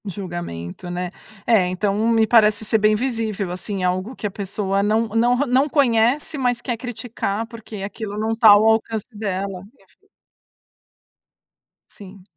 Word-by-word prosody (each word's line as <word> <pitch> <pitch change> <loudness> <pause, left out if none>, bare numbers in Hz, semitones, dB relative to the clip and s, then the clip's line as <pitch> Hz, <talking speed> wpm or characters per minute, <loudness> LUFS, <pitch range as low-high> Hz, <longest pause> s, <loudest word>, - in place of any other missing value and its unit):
Julgamento, 175 - -6
né. 175 0 -4 0.3
É, 215 -6 +4
então 195 +2 -1
me 225 -1 +4
parece 215 -1 +4
ser 220 - +2
bem 215 0 +3
visível, 220 -5 -2
assim, 185 +1 -4
algo 185 +7 -1
que - - -7
a 205 - -1
pessoa 195 0 -2
não 220 +2 +1
não 235 +3 +2
não 265 +3 +2
conhece, 260 +2 +2
mas 245 -2 +1
quer 240 0 -3
criticar, 225 -2 -4
porque 225 -1 -10
aquilo 205 0 -6
não 220 +1 -1
tá 225 -1 +6
ao 205 +1 +7
alcance 220 -1 +1
dela. 195 -3 -4 2.3
Sim. 195 -1 -13
215 Hz, 140 wpm, -21 LUFS, 195-230 Hz, 2.3 s, ao